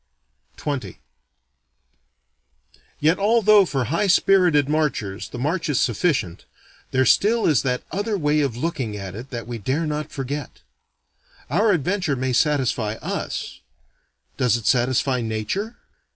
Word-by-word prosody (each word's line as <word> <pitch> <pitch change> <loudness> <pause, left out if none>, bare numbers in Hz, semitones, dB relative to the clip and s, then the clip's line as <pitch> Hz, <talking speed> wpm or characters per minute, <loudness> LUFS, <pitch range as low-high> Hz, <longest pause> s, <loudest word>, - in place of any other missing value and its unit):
XX 130 - -4 2.0
Yet 160 +5 +2
although 210 -1 +5
for 135 -6 -1
high 165 - 0
spirited 180 -6 +4
marchers 145 -10 -1
the - - -8
march 155 +6 -1
is 140 - +1
sufficient, 120 - 0 0.4
there 130 0 +2
still 225 - +3
is 150 - +3
that 125 -2 -2
other 205 +2 -1
way 150 -2 +1
of 135 -5 -1
looking 130 -8 -3
at 95 -2 -7
it 120 +6 -8
that 120 -2 -6
we 120 0 -6
dare 135 - -1
not 150 0 -3
forget. 140 +1 -5 0.9
Our 215 +1 +3
adventure 180 -2 0
may 130 0 -2
satisfy 130 -6 +1
us: - - -5 0.8
does 125 -3 +2
it 115 - -9
satisfy 125 +1 +2
Nature? 115 - -3
140 Hz, 130 wpm, -22 LUFS, 120-170 Hz, 2.0 s, although